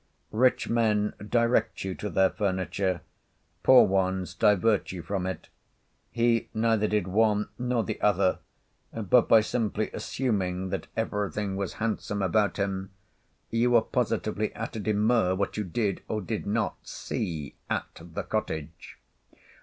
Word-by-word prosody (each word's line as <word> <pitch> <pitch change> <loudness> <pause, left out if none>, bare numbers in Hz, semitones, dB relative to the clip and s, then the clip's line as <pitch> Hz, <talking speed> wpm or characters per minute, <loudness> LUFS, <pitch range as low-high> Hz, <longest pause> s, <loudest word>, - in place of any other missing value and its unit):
Rich 125 +3 +3
men 110 -3 +1 0.2
direct 120 0 +2
you 95 -1 -3
to 105 - -5
their 95 -1 +3
furniture, 95 -2 -1 0.6
poor 130 -1 +7
ones 95 -1 0
divert 105 -1 +2
you 90 -2 -6
from 95 -2 -2
it; 95 - -6 0.6
he 115 -1 +1
neither 110 -1 +2
did 105 -3 0
one 105 +1 +2
nor 125 -2 0
the - - -5
other, 100 -2 +2 0.5
but 115 +2 +3
by 110 - +7
simply 110 -1 -1
assuming 95 -7 -2
that 95 0 -4
everything 105 -2 -2
was 100 -2 -3
handsome 105 -2 -2
about 100 +1 +2
him, 95 -1 -2 0.6
you 115 +2 +2
were 120 -2 +5
positively 110 -3 -1
at - - -5
a - - -3
demur 105 -1 +2
what 100 +1 -2
you 105 - -1
did, 100 +1 -1
or 110 - -2
did 95 - -4
not - - 0
see, 75 -5 -4 0.2
at - - -3
the 85 0 -6
cottage. 80 -7 -4
105 Hz, 140 wpm, -27 LUFS, 95-115 Hz, 0.6 s, poor